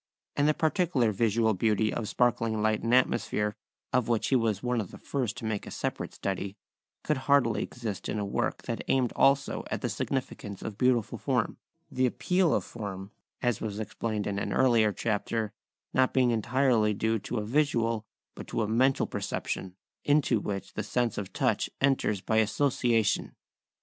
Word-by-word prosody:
And 145 +1 +3
the 155 - +3
particular 155 - +2
visual 110 +2 +2
beauty 110 +2 +1
of 110 -3 -3
sparkling 115 -3 +1
light 110 0 +2
and 115 - -1
atmosphere, 110 -4 +2 0.4
of 125 -3 +2
which 115 -2 +1
he 135 - +3
was 110 -4 +1
one 125 -2 +1
of 100 - -7
the - - -11
first 125 -4 -3
to 115 - -6
make 110 -2 -2
a - - -5
separate - - -4
study, 100 +1 -3 0.5
could 150 - +1
hardly 130 -6 +4
exist 110 -5 -5
in - - -1
a 105 - -1
work 100 - -2
that - - -4
aimed 130 -3 +2
also 135 0 +3
at - - -3
the - - -1
significance 110 -6 -4
of 110 - -5
beautiful 125 -4 +2
form, - - 0 0.3
the 130 0 +2
appeal 180 +6 +1
of - - +1
form, 100 -3 -7 0.3
as 120 -4 +1
was 105 -1 -3
explained 110 0 -3
in 100 -1 -1
an - - -2
earlier 115 -5 +4
chapter, 110 +1 -2 0.4
not 130 0 +2
being 125 -2 +4
entirely 115 -2 +2
due 110 +2 0
to 120 - -4
a 105 - -2
visual 115 -4 +1 0.3
but - - -9
to - - -1
a - - -1
mental 130 +5 +3
perception, 95 -1 -4 0.3
into 145 -6 +3
which 100 -1 -5
the - - -2
sense 120 +2 -1
of 100 -2 -6
touch - - 0
enters 135 -7 +2
by 110 - 0
association. 115 -1 +1
115 Hz, 175 wpm, -29 LUFS, 105-125 Hz, 0.5 s, hardly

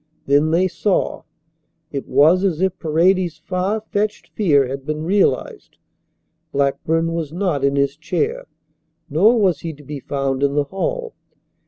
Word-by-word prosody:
Then 145 +3 +3
they 175 +4 +3
saw. 195 +2 -1 0.7
It 140 -2 -5
was 165 +6 +4
as 180 -5 0
if 190 0 0
Paredes's 170 +1 +2
far 185 +6 -2
fetched 210 0 -3
fear 145 -10 +2
had 135 +1 -5
been 155 +2 -3
realized. 205 - 0 0.7
Blackburn 155 +4 0
was 165 -3 -3
not 170 -5 -1
in 140 0 +2
his 140 0 +1
chair, 465 - -2 0.6
nor 210 - +4
was 185 -7 +2
he 165 -1 -5
to 145 0 -15
be 145 +1 -6
found 135 0 -2
in 140 0 +1
the 145 - +3
hall. 465 - -3
165 Hz, 150 wpm, -20 LUFS, 140-190 Hz, 0.7 s, was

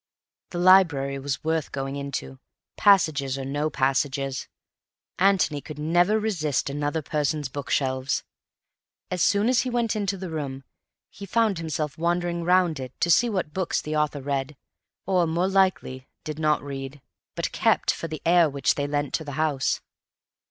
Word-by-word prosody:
The 175 - -6
library 165 -7 +4
was 135 0 -3
worth 160 -1 -1
going 135 0 -4
into, 140 - -5 0.4
passages 155 -9 +3
or 135 - -5
no 145 +3 -1
passages. 135 -1 -1 0.7
Antony 185 -6 +3
could 150 0 -9
never 175 +7 +2
resist 155 -11 -1
another 145 +2 -2
person's 150 -1 -1
bookshelves. 130 -1 -1 0.9
As 180 -1 -1
soon 205 +2 +3
as 250 0 +3
he 255 - -3
went 235 -2 0
into 200 -2 -1
the 185 -2 -6
room, 140 -4 -4 0.5
he 200 - -9
found 215 -2 +1
himself 155 -3 -3
wandering 170 0 0
round 180 -3 +3
it 130 -1 -8
to 170 - +2
see 240 +7 +4
what 185 -8 -2
books 185 -1 -1
the 155 0 -4
owner 150 -1 0
read, 135 +1 -3 0.5
or 180 -3 +2
(more 170 +3 +1
likely) 185 -9 +1 0.2
did 155 0 -6
not 155 -2 +2
read, 135 0 -6 0.4
but - - -2
kept - - +2
for 165 - -5
the 155 -1 -7
air 170 -1 +5
which 140 -1 +1
they 145 0 -2
lent 145 -1 -2
to 160 - -1
the 145 -2 -7
house. 150 -2 0
155 Hz, 160 wpm, -25 LUFS, 140-180 Hz, 0.9 s, air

